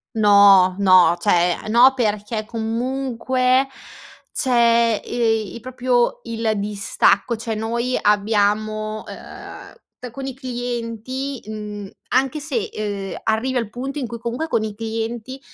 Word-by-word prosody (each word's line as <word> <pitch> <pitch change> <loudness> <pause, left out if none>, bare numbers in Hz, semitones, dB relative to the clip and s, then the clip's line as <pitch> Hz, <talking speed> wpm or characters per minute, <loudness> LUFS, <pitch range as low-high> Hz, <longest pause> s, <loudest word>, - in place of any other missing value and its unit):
No, 200 -3 +6
no. 185 -4 +6
Cioè, 175 -3 +2
uhm, - - -6
no 245 +4 +6
perché 215 -2 -2
comunque, 255 +3 0 0.6
c'è, 235 -3 +3
ehm, 225 -4 -1
i 235 - -8
proprio 250 0 0
il 225 -1 -1
distacco, 205 +2 +1
cioè 225 0 -4
noi 235 +3 -2
abbiamo 215 +1 0
uhm, - - -10 0.3
c 250 - -7
con 270 +3 -7
i 265 - -5
clienti 245 +1 -5
mhmm, 210 -2 -7 0.2
anche 265 +3 +1
se, 425 +9 -3
uhm, 200 -2 -4
arrivi 235 +4 -1
al 230 -3 -3
punto 270 +5 -5
in 250 - -4
cui, 235 - -7
comunque, 240 +7 -4
con 220 - 0
i 215 -1 -5
clienti 225 +3 -5
230 Hz, 130 wpm, -21 LUFS, 210-250 Hz, 0.6 s, No